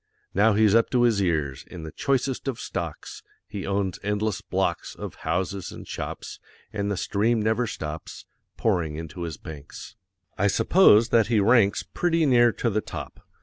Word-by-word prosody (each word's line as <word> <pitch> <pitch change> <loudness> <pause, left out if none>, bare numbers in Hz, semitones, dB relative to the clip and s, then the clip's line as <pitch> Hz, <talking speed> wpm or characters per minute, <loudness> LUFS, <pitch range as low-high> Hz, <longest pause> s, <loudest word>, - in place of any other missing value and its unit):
Now 105 +3 +4
he's 105 -1 +4
up 115 0 +4
to 125 -1 +2
his 115 -4 +3
ears 75 -7 -1
In 90 -3 -8
the 80 - -7
choicest 135 -1 -1
of 130 -3 -2
stocks. 85 -5 -6 0.3
He 100 -2 -6
owns 100 -2 -1
endless 105 -1 -1
blocks - - -2
Of - - -7 0.2
houses 95 +1 -2
and - - -10
shops, - - -6 0.3
And 100 -1 -2
the 100 - -1
stream 110 +5 +1
never 110 +3 +1
stops 75 -4 -7 0.3
Pouring 85 -8 0
into 80 +3 -7
his 85 -3 -4
banks. 75 +6 -10 0.4
I 100 - +3
suppose 115 - +5
that 115 -3 +4
he 115 -2 +2
ranks 105 -1 +4
Pretty 165 -2 0
near 120 -3 +5
to 115 +1 -1
the 105 +1 0
top. - - -8
105 Hz, 170 wpm, -25 LUFS, 90-115 Hz, 0.4 s, suppose